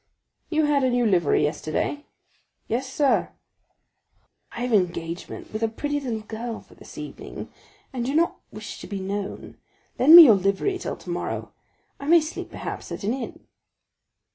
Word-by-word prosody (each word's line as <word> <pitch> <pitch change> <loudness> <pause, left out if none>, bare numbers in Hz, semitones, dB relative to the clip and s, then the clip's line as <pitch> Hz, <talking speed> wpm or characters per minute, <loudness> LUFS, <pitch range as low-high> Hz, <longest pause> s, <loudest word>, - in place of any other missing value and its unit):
"You 315 -1 +2
had 290 -2 +2
a 260 - +3
new 245 -1 +2
livery 175 -8 +3
yesterday?" 155 - -2 0.6
"Yes, 255 +3 -2
sir." 280 -1 +2 1.2
"I 240 - -7
have 245 0 -1
an 215 - +6
engagement 170 0 -5
with 215 - -3
a 225 - +2
pretty 290 +6 -2
little 240 -6 -3
girl 225 +2 -6
for - - -19
this - - -14
evening, - - -8 0.4
and 245 -2 -2
do 270 +4 -2
not 335 +2 +2
wish - - -8
to - - -8
be 200 -2 -4
known; 200 +1 -5 0.4
lend 300 +6 +9
me 345 - +14
your 245 -8 +8
livery 200 - 0
till - - -4
tomorrow. - - -5 0.5
I 280 - -7
may 340 +2 +7
sleep, 310 +1 -6
perhaps, - - -7
at - - -6
an 210 +4 0
inn." 260 -2 -7
240 Hz, 165 wpm, -24 LUFS, 200-290 Hz, 1.2 s, me